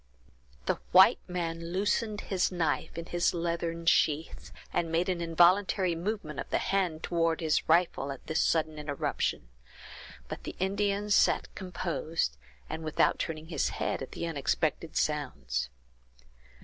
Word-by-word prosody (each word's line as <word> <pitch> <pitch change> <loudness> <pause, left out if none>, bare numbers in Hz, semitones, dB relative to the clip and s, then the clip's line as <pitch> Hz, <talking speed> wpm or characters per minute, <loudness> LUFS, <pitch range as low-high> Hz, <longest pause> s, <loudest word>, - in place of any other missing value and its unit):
The - - 0
white - - +8
man 170 -1 -3
loosened 210 +2 0
his 190 -1 0
knife 165 -2 -1
in 165 - -4
his 175 +1 +1
leathern 170 0 -2
sheath, 160 -1 +1 0.2
and 165 -1 0
made 170 +3 +1
an 180 -2 -1
involuntary 180 +2 +3
movement 170 -2 -3
of - - -5
the - - +2
hand 185 -5 0
toward 165 -1 +1
his 160 -1 0
rifle, 165 -4 +3
at 135 - -9
this 160 0 0
sudden 155 -2 +1
interruption; 145 - -2 0.8
but - - -6
the - - -6
Indian 200 +2 0
sat - - +3
composed, 170 - -2 0.3
and 160 - -5
without 155 -1 +2
turning 160 -1 -4
his 155 -5 0
head - - -1
at 135 - -7
the - - -4
unexpected 160 +1 -1
sounds. 125 - -1
165 Hz, 140 wpm, -30 LUFS, 155-180 Hz, 0.8 s, white